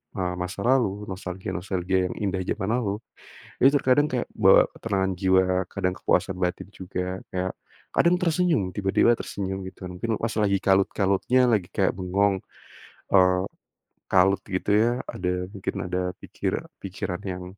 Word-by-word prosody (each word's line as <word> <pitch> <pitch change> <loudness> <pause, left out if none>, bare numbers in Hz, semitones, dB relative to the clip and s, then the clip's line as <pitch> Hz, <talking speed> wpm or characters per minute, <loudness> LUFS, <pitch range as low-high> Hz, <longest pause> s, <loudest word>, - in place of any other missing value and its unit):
eee, 90 -1 -2
masa 90 +2 -4
lalu 105 -6 +1
nostalgia-nostalgia 95 0 -2
yang - - -7
indah 95 -3 -1
zaman 95 +3 -2
lalu, 105 -5 -1 0.6
itu 135 - +6
terkadang 145 +1 +3
kayak 125 -2 0
bawa 95 -3 +6
ketenangan 95 -3 -1
jiwa 95 -1 +4 0.3
kadang 90 0 -1
kepuasan 95 +1 +1
batin 90 +1 -2
juga 90 0 -4
kayak, 95 0 -1 0.4
kadang 170 +1 +4
tersenyum 165 - +1
tiba-tiba 100 +3 +3
tersenyum 95 -1 -4
gitu 95 - -11
mungkin 110 +5 -2
pas 115 - -1
lagi 100 -1 +3
kalut-kalutnya 100 +4 +2
lagi 100 -6 +1
kayak 95 -2 +3
bengong, 95 +1 +1 0.7
eee, 90 -1 +5 0.7
kalut 95 +1 +4
gitu 95 +1 -1
ya 115 +3 +4 0.2
ada 90 0 -2
mungkin 100 -3 -4
ada 90 +1 -1 0.2
pikira - - -3 0.2
pikiran 95 -2 -4
yang, 90 -2 -5
95 Hz, 140 wpm, -25 LUFS, 90-105 Hz, 0.7 s, itu